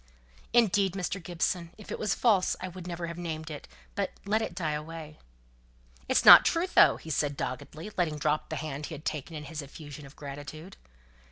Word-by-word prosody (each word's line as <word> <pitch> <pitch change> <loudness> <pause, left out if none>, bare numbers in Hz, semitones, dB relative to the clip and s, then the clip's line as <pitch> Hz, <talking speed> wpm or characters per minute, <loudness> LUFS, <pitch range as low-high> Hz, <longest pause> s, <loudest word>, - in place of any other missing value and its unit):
"Indeed, 205 -5 +3
Mr. 195 0 -3
Gibson, 170 0 -2
if 210 - -11
it - - -4
was 205 -2 0
false 205 -6 +3
I 185 - -4
would 180 0 -9
never 170 -1 -4
have 170 0 -6
named 160 -2 -5
it, 150 - -8 0.3
but - - -1 0.2
let 215 +2 +2
it - - -4
die 165 -5 -1
away." 155 0 -6 0.9
"It's - - +3
not - - +12
true, 335 +2 +2
though!" 370 - +5
said 150 -2 -1
he, - - -13
doggedly, 155 - -5
letting 160 -4 0
drop 150 +1 0
the - - -3
hand 150 -1 -4
he 160 - -6
had 150 - -12
taken 155 +2 -3
in 150 - -6
his 155 +1 -6
effusion 145 0 -10
of 135 - -16
gratitude. 145 +5 -8
160 Hz, 195 wpm, -29 LUFS, 150-185 Hz, 0.9 s, not